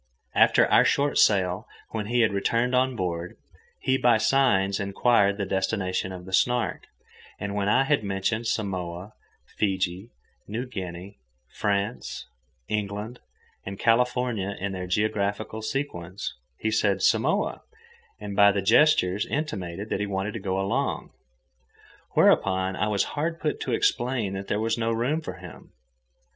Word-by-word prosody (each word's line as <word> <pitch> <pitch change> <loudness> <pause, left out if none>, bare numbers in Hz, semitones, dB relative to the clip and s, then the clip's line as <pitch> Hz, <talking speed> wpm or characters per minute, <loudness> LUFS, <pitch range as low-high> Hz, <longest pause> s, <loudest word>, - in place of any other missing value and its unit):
After - - +5
our - - +5
short 140 0 +2
sail, 95 +1 +3 0.2
when 105 -2 -3
he 120 +1 +2
had 110 -3 +3
returned 115 +5 +1
on 130 0 +2
board, 85 -3 -3 0.4
he 130 0 +1
by 120 -2 +5
signs 105 -6 +2
inquired 100 0 +2
the 100 - -2
destination 95 -1 -1
of 90 -1 -8
the 95 - -10
Snark, 120 +4 +1 0.5
and 100 0 -4
when 100 0 0
I 130 +5 +4
had 145 -4 +1
mentioned 100 +4 -1
Samoa, 95 -2 -3 0.3
Fiji, 95 0 -2 0.4
New 115 +5 -3
Guinea, 95 -4 -7 0.3
France, 100 - -2 0.4
England, 105 +3 -3 0.4
and 95 0 -6
California 120 -4 +1
in 100 +1 -2
their 90 -1 -5
geographical 105 +2 -1
sequence, 100 -7 -4 0.2
he 110 - -1
said 105 -3 +1
"Samoa," - - +2 0.6
and 105 -1 -6
by 100 0 +7
gestures 105 -3 +3
intimated 105 - -4
that - - 0
he 105 - -1
wanted 100 +1 -2
to 115 - -4
go 95 -1 -2
along. 95 0 -1 1.0
Whereupon 95 0 +3
I 105 - 0
was 105 -2 +1
hard 165 +3 -2
put 150 - -2
to 130 - -3
explain 120 -4 0
that 95 0 -5
there 105 - 0
was 115 +1 0
no 115 0 0
room 125 +8 0
for - - -6
him. - - -12
105 Hz, 145 wpm, -26 LUFS, 95-115 Hz, 1.0 s, by